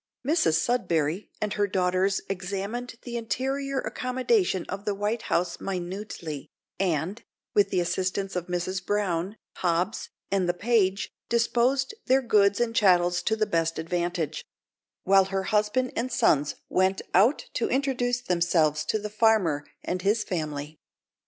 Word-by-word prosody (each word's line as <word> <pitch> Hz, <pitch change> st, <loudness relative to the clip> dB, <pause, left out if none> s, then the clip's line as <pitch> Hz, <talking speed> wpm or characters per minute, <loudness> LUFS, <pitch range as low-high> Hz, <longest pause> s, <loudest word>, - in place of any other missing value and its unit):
Mrs 285 Hz, -, +3 dB
Sudberry 170 Hz, -3 st, 0 dB
and 210 Hz, -1 st, -1 dB
her 205 Hz, -1 st, +1 dB
daughters 185 Hz, +1 st, +1 dB
examined 200 Hz, +6 st, -4 dB
the 240 Hz, -1 st, -4 dB
interior 270 Hz, +5 st, -2 dB
accommodation 255 Hz, -, 0 dB
of 195 Hz, +1 st, -5 dB
the 205 Hz, -1 st, -1 dB
White 210 Hz, +3 st, -1 dB
House 170 Hz, 0 st, 0 dB
minutely, 180 Hz, -5 st, -5 dB, 0.3 s
and, 185 Hz, +2 st, -1 dB, 0.3 s
with 205 Hz, -1 st, +4 dB
the 185 Hz, -, +1 dB
assistance 185 Hz, +2 st, -1 dB
of 180 Hz, 0 st, -2 dB
Mrs 180 Hz, +2 st, -2 dB
Brown, 195 Hz, -1 st, -1 dB, 0.2 s
Hobbs, 180 Hz, +3 st, 0 dB, 0.2 s
and 190 Hz, -3 st, +1 dB
the 175 Hz, -, +1 dB
page, 200 Hz, -1 st, +1 dB, 0.2 s
disposed 240 Hz, -, +2 dB
their 265 Hz, +1 st, +4 dB
goods 200 Hz, -4 st, +3 dB
and 235 Hz, -1 st, 0 dB
chattels 180 Hz, -4 st, +4 dB
to 220 Hz, +5 st, +1 dB
the 215 Hz, -1 st, +1 dB
best 165 Hz, -5 st, 0 dB
advantage; 170 Hz, -1 st, -2 dB, 0.6 s
while 195 Hz, 0 st, +5 dB
her 195 Hz, 0 st, -2 dB
husband 215 Hz, +5 st, +1 dB
and 250 Hz, +3 st, -2 dB
sons 150 Hz, -10 st, +2 dB
went 190 Hz, +1 st, +1 dB
out 220 Hz, +10 st, +4 dB
to 235 Hz, -, 0 dB
introduce 245 Hz, -2 st, 0 dB
themselves 170 Hz, -6 st, +2 dB
to -, -, +1 dB
the 210 Hz, 0 st, -4 dB
farmer 210 Hz, -10 st, +2 dB, 0.2 s
and 180 Hz, 0 st, -2 dB
his 210 Hz, +3 st, +2 dB
family. 155 Hz, -3 st, -4 dB
195 Hz, 140 wpm, -27 LUFS, 175-230 Hz, 0.6 s, while